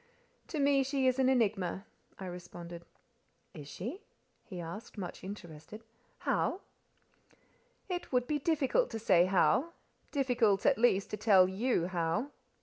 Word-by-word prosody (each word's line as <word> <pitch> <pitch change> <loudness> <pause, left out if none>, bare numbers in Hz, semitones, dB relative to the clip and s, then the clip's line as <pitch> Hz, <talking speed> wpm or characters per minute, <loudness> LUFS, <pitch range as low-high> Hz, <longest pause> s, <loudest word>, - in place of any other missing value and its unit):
"To 315 - -5
me 280 -1 +4
she 270 0 0
is 255 0 +2
an 260 -1 +4
enigma," 200 -7 0 0.3
I 190 - -7
responded. 175 -1 -8 0.7
"Is 150 -6 -9
she?" 230 - -6 0.4
he 185 -5 -8
asked—much 180 +2 -7
interested. 185 +1 -9 0.3
"How?" 380 - 0 1.3
"It 355 -2 -4
would 250 -1 +2
be 295 +3 -1
difficult 320 - +1
to 225 - -4
say 185 -5 +4
how—difficult, 245 - +1
at - - +4
least, 200 -5 +3
to 210 - -3
tell 195 -3 +5
you 195 -1 0
how." 175 - -1
210 Hz, 130 wpm, -32 LUFS, 180-265 Hz, 1.3 s, tell